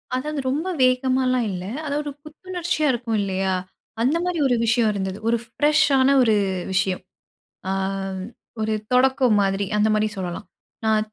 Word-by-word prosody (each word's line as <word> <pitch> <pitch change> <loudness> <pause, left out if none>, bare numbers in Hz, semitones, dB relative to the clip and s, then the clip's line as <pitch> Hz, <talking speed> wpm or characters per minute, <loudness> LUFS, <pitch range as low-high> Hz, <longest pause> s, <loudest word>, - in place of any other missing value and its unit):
அதாவது 295 +3 -3
ரொம்ப 300 +7 -1 0.2
வேகமாலாம் 255 -1 +2
இல்ல. 180 -1 -5 0.2
அதாவது 290 0 -1
ஒரு 290 - -4
புத்துணர்ச்சியா 345 0 -2
இருக்கும் 235 -2 -2
இல்லையா, 190 -1 -1 0.5
அந்த 270 +8 +2
மாரி 360 -2 -1
ஒரு 250 - +2
விஷயம் 230 0 +3
இருந்தது. 190 -1 -3
ஒரு 235 - +3
ஃப்ரெஷ்ஷான 280 +1 +3
ஒரு 225 -3 +4 0.4
விஷயம். 190 -1 0 0.7
அ - - 0 0.9
ஒரு 220 0 0 0.2
தொடக்கம் 255 -2 +4
மாதிரி 195 0 0
அந்த 210 +1 +3
மாதிரி 215 0 +2
சொல்லலாம். 185 +2 -5 0.4
நான் 215 -1 +2
245 Hz, 140 wpm, -23 LUFS, 210-280 Hz, 0.9 s, ஒரு